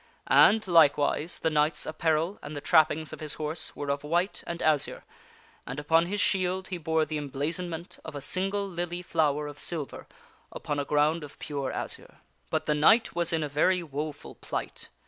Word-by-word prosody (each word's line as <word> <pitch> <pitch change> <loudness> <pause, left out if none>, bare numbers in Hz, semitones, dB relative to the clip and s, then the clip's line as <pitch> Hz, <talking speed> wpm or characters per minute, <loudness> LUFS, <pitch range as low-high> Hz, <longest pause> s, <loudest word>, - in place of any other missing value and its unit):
And, 220 -2 +5
likewise, 155 -1 +3
the 160 - 0
knight's 150 +1 +1
apparel 160 +4 0
and 145 +1 -7
the - - -2
trappings 155 +1 +3
of - - -8
his 155 -1 -4
horse 155 +1 -3
were 145 -1 -2
of 140 0 -3
white 175 +6 0
and 170 0 -4
azure, 155 -4 +1 0.6
and 125 +3 -4
upon 165 +3 +3
his 205 +3 -2
shield 190 -1 +1
he 180 -2 -4
bore 160 0 +1
the 155 -1 -3
emblazonment 160 +5 -4
of 160 - -8
a - - -3
single 195 +7 -1
lily 175 -1 -4
flower 150 -3 +1
of 145 0 -8
silver 155 -5 -4 0.4
upon 145 -1 -3
a 140 - -1
ground 150 +3 +2
of 145 - -11
pure 140 -3 -4
azure. - - -6 0.3
But - - -1
the 150 - +2
knight 215 +11 +4
was 170 -1 0
in 160 -2 0
a - - -1
very 175 +5 +2
woful 150 0 -6
plight. - - -6
160 Hz, 185 wpm, -28 LUFS, 150-175 Hz, 0.6 s, And